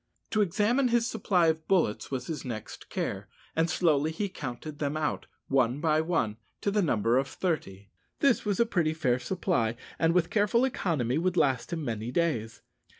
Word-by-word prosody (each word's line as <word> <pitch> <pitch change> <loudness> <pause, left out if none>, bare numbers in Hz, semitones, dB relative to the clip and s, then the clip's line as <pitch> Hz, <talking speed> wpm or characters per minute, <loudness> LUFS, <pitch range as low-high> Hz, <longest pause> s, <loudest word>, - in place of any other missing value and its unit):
To 215 - +2
examine 210 +8 +2
his 235 -1 +2
supply 200 -7 +1
of 160 0 -2
bullets 165 - +1
was 130 -2 -3
his 155 -1 -4
next 115 -4 -7
care, - - -3 0.3
and 165 +1 +2
slowly 155 -3 +2
he 200 +5 -2
counted 145 -1 -7
them 145 +1 -1
out, 155 - -2 0.2
one 130 -1 +2
by 155 0 +2
one, 160 -11 0 0.2
to 200 - 0
the 205 +1 +2
number 120 - +2
of 135 - -1
thirty. 100 - -3 0.3
This 275 -4 +3
was 205 -3 -1
a 235 - +5
pretty 170 -8 0
fair 130 -6 +1
supply, 125 - 0 0.2
and 165 +1 +3
with 175 -1 +2
careful 215 +4 +3
economy 155 - 0
would 180 +1 0
last 135 0 +2
him 160 -3 -3
many 115 -1 -3
days. 125 -7 -1
160 Hz, 180 wpm, -29 LUFS, 125-185 Hz, 0.3 s, a